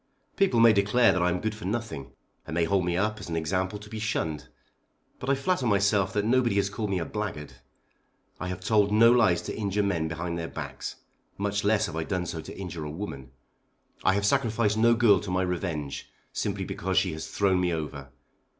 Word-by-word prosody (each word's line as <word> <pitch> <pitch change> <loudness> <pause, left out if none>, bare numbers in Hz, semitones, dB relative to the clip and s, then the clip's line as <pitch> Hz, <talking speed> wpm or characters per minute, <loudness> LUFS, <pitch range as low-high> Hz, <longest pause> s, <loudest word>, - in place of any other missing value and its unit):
People 190 -12 +3
may 115 -1 +7
declare 105 +4 +4
that 90 - 0
I 90 - +3
am 90 0 -1
good 110 +3 -2
for 105 -3 -9
nothing, 105 - -4 0.3
and 80 - -4
may 85 - +2
hold 95 +1 +1
me 85 0 0
up 105 +2 0
as 105 - -8
an 85 - -2
example 95 +5 -1
to 105 0 -12
be 110 +1 -6
shunned. 80 -10 -2 0.7
But 125 - -4
I 140 - +4
flatter 135 -1 0
myself 100 -2 +2
that 105 0 0
nobody 120 -2 +2
has 100 -1 +1
called 105 0 -3
me 95 - 0
a 85 - -2
blackguard. 100 -9 -5 0.9
I 90 - -4
have 90 0 -5
told 105 -2 +3
no 115 +2 +6
lies 110 -8 +4
to - - -5
injure 105 -1 0
men 85 -5 0
behind 85 +1 -3
their 85 - -3
backs; - - -6 0.4
much 100 0 -1
less 110 +1 +3
have 85 - -6
I 80 - -1
done 90 +1 -2
so 80 -1 -4
to - - -10
injure 85 -4 -5
a 75 - -5
woman. 75 -6 -6 0.7
I 95 - +4
have 100 0 0
sacrificed 115 -3 +2
no 115 +1 +5
girl 110 -5 +5
to 100 - -7
my 90 0 +1
revenge, 85 -6 -3 0.2
simply - - -2
because 95 +1 -3
she 95 -3 +3
has 80 0 -6
thrown 95 -2 +1
me 90 -1 +1
over. 75 -4 -4
100 Hz, 215 wpm, -27 LUFS, 85-110 Hz, 0.9 s, may